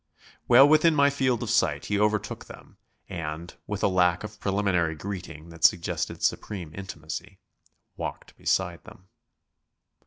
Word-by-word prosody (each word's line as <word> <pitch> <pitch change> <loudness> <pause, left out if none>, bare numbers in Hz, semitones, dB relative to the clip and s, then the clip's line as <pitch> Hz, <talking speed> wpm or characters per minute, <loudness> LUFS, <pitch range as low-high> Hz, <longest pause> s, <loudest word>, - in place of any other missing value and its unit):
Well 130 +4 +8
within 155 +2 +5
my 140 0 +5
field 130 -4 0
of - - -2
sight - - +1
he 100 -1 0
overtook 105 -1 0
them - - -14 0.3
and, 80 0 -6
with 105 -1 -4
a - - +5
lack 90 -1 +2
of 105 0 -8
preliminary 95 -5 +1
greeting 85 -2 -7
that 85 -1 -12
suggested 85 - +2
supreme 90 -7 -2
intimacy, 95 +1 -7 0.6
walked - - -6
beside 90 -3 -1
them. 105 -4 -16
95 Hz, 135 wpm, -26 LUFS, 85-105 Hz, 0.6 s, Well